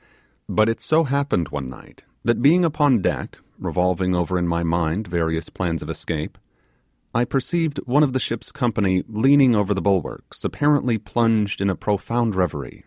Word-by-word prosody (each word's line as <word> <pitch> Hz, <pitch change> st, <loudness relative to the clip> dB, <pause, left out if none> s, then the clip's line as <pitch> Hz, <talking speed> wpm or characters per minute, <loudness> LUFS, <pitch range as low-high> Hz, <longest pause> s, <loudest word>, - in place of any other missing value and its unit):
But 110 Hz, 0 st, +3 dB
it 115 Hz, -, -1 dB
so 160 Hz, +1 st, +2 dB
happened 140 Hz, -, 0 dB
one 70 Hz, -3 st, -5 dB
night, 65 Hz, -, -15 dB, 0.2 s
that 120 Hz, +1 st, +1 dB
being 170 Hz, +7 st, +5 dB
upon 145 Hz, -, +2 dB
deck, -, -, -2 dB, 0.2 s
revolving 90 Hz, 0 st, 0 dB
over 90 Hz, +1 st, 0 dB
in 90 Hz, -, -1 dB
my 85 Hz, 0 st, 0 dB
mind 85 Hz, +4 st, -1 dB
various 80 Hz, -2 st, -1 dB
plans 85 Hz, -3 st, -3 dB
of -, -, -5 dB
escape, 80 Hz, -2 st, -5 dB, 0.7 s
I 120 Hz, -, +2 dB
perceived 145 Hz, +4 st, -1 dB
one 135 Hz, +4 st, +3 dB
of 145 Hz, -3 st, +3 dB
the 130 Hz, -, 0 dB
ship's 115 Hz, -2 st, -4 dB
company 105 Hz, -9 st, 0 dB
leaning 130 Hz, +4 st, +4 dB
over 105 Hz, -1 st, +1 dB
the -, -, -1 dB
bulwarks, 95 Hz, -4 st, -2 dB
apparently 145 Hz, -5 st, +1 dB
plunged 110 Hz, 0 st, 0 dB
in 100 Hz, -, +2 dB
a 95 Hz, -, 0 dB
profound 110 Hz, +4 st, -1 dB
reverie. 85 Hz, -9 st, -3 dB
105 Hz, 170 wpm, -22 LUFS, 90-130 Hz, 0.7 s, being